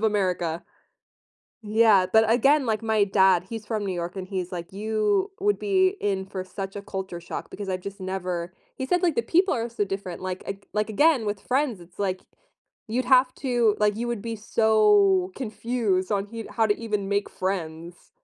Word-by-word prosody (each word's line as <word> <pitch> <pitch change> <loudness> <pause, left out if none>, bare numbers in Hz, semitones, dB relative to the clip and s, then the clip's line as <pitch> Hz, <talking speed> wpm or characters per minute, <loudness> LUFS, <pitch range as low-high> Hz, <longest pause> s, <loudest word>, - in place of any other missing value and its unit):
of - - -10
America. 180 -6 0 1.0
Yeah, 210 -3 +4
but 220 0 +5
again, 270 +4 +4
like 220 0 0
my 220 -2 +2
dad, 190 -3 +4
he's 225 -2 -6
from 210 -2 -2
New 185 - -2
York 175 +2 -4
and 185 -1 -6
he's 185 -2 -4
like, 175 0 -6
"You 220 - 0
would 410 +1 +2
be 380 -1 +2
in 190 -2 -1
for 190 -1 -5
such 195 +1 -6
a 200 - -5
culture 190 -3 -5
shock 170 - -7
because 205 -2 -7
I've 185 -1 -2
just 200 +2 -8
never" 185 -2 -3 0.2
he 260 - -3
said, 355 +5 +1
like, 340 -4 +2
the 235 - +1
people 355 +10 +2
are 235 0 -2
so 210 -3 -1
different, 195 -2 -5
like 185 0 -4
ag 195 0 -6
like, 210 +1 0
again, 285 +1 +3
with 205 -1 -2
friends, 255 -6 0
it's 175 +2 -17
like 190 -2 -1 0.7
you'd 245 +4 -1
have 255 0 +5
to 240 -5 +1
like, 210 0 +3
you 240 +1 -2
would 235 -4 -2
be 230 -1 -4
so 210 -4 +3
confused 220 -5 -1
on 200 0 0
he 225 +1 -7
how 225 - +2
to 205 - +1
even 210 -4 -2
make 200 0 0
friends. 170 -2 -5
205 Hz, 195 wpm, -25 LUFS, 190-230 Hz, 1.0 s, but